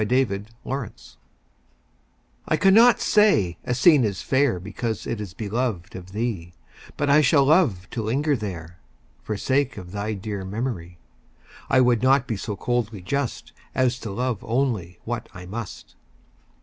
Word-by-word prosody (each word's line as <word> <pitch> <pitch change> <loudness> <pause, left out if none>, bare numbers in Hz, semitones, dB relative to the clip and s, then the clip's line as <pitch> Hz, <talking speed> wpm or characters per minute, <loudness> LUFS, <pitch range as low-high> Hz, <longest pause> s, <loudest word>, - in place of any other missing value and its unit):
IMPARTIALITY 115 +2 -3 1.3
I 155 - +2
cannot 215 +5 +6
say 195 - +3
a 125 - -1
scene 145 0 +6
is 100 -4 -2
fair 130 -8 +2
Because 105 +4 -4
it 115 -2 -3
is 100 -3 -7
beloved 110 -2 -3
of 95 0 -9
thee 100 -6 -3 0.4
But 145 - 0
I 145 +2 +6
shall 140 -1 +4
love 135 - +3
to 115 - -3
linger 140 +7 +1
there, 85 -6 -6 0.4
For 105 - -4
sake 135 +3 0
of 90 -3 -9
thy 105 +2 -3
dear 100 0 -5
memory; 95 -4 -4 0.7
I 130 - +5
would 120 -3 +3
not 130 +1 +4
be 115 - -2
so 105 +1 -4
coldly 115 -2 -2
just 140 +5 -3 0.2
As 125 -1 +1
to 110 - -6
love 120 +1 -2
only 115 -9 -1
what 120 +1 -4
I 90 -1 -9
must. 105 +2 -7
115 Hz, 150 wpm, -24 LUFS, 100-130 Hz, 1.3 s, cannot